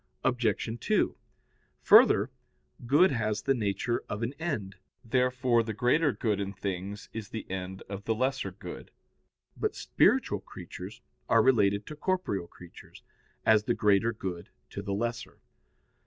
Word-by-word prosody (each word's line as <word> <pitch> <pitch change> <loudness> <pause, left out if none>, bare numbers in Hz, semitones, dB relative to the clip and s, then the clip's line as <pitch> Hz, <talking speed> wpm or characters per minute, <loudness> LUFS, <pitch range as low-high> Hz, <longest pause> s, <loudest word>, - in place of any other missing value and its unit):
Obj. 120 -2 0
2: - - +1 0.7
Further, - - +6 0.6
good 150 +8 +5
has 110 -4 -1
the 135 - +3
nature 110 0 -1
of 105 +3 -3
an 120 +4 -2
end; 110 - -3 0.3
therefore 125 0 +2
the 110 -1 -4
greater 140 +7 +3
good 105 -2 -1
in 100 0 -3
things 100 +1 -5
is 110 -2 -6
the 110 - -6
end 95 0 -5
of 100 0 -7
the 110 - +1
lesser 130 -2 -1
good. 95 - -9 0.7
But - - -2
spiritual - - +2
creatures - - -10 0.3
are 115 -1 +5
related 105 -5 +3
to 150 - -8
corporeal 150 - -1
creatures, 90 -1 -14 0.4
as 110 -1 +5
the 120 - +1
greater 105 +1 +3
good 95 -6 -6 0.2
to 100 - -5
the 100 -1 -3
lesser. 115 +2 -3
110 Hz, 140 wpm, -29 LUFS, 100-125 Hz, 0.7 s, Further